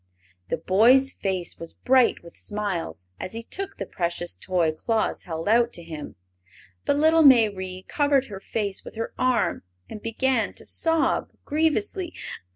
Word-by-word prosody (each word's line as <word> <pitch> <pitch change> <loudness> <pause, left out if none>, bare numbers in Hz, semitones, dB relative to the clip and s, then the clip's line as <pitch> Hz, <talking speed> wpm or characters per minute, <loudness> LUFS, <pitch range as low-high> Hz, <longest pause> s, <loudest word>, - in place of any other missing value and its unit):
The - - 0
boy's 235 - +5
face 185 -3 -3
was 165 0 -6
bright 255 -6 +3
with 170 - -13
smiles 195 - -4
as 185 - -5
he 230 +1 -5
took 390 +10 -6
the 195 - -4
precious 175 -1 -3
toy 175 -4 0
Claus 220 +8 -1
held 165 0 -5
out 235 +2 +4
to 170 - -5
him; 155 -3 -8 0.7
but 285 - +2
little 320 +2 +5
Mayrie 200 -9 +4
covered 285 -3 +2
her 200 -6 -8
face 200 -1 -3
with - - -10
her 225 +1 -4
arm 255 -2 +1 0.3
and 215 - -8
began 230 +2 0
to - - -10
sob 325 -1 +1 0.2
grievously. 330 +4 0
220 Hz, 155 wpm, -25 LUFS, 185-265 Hz, 0.7 s, boy's